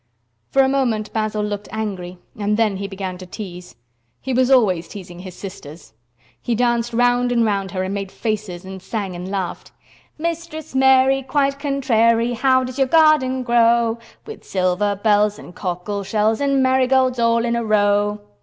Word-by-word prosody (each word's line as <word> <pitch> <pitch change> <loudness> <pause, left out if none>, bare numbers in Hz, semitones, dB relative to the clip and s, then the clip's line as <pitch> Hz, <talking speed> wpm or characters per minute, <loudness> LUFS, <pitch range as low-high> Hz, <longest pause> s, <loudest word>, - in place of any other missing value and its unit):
For 270 - +4
a - - +3
moment 240 -6 -1
Basil 215 -1 -1
looked 205 0 -4
angry, 190 -5 -5 0.2
and 210 0 -1
then 215 -4 +1
he 200 +1 -4
began 190 -2 -6
to 185 - -10
tease. 180 - -9 0.4
He 265 - -4
was 255 +1 +2
always 195 -10 +3
teasing 180 -3 -10
his 185 -1 -9
sisters. 170 -5 -10 0.5
He 235 - -1
danced 240 0 +1
round 245 +1 +2
and 235 -1 +2
round 200 -2 -1
her 185 0 -3
and 190 +1 -3
made 195 -1 -4
faces 210 -5 -4
and 190 0 -8
sang 195 -1 -4
and 180 +2 -6
laughed. 190 -3 -4 0.5
"Mistress 330 -2 -5
Mary, 265 0 +4
quite 275 +1 0
contrary, 240 -4 +2
How 260 +2 +3
does 255 +1 -6
your 270 - +3
garden 285 -4 +4
grow? 235 -1 +3 0.3
With 440 - -10
silver 190 +2 0
bells, 210 0 +2
and - - -12
cockle 185 +3 -4
shells, 215 +3 0
And 275 -1 +2
marigolds 260 -1 +2
all 230 0 +2
in 235 0 0
a 235 - -1
row." 205 -1 +1
220 Hz, 170 wpm, -20 LUFS, 195-255 Hz, 0.5 s, For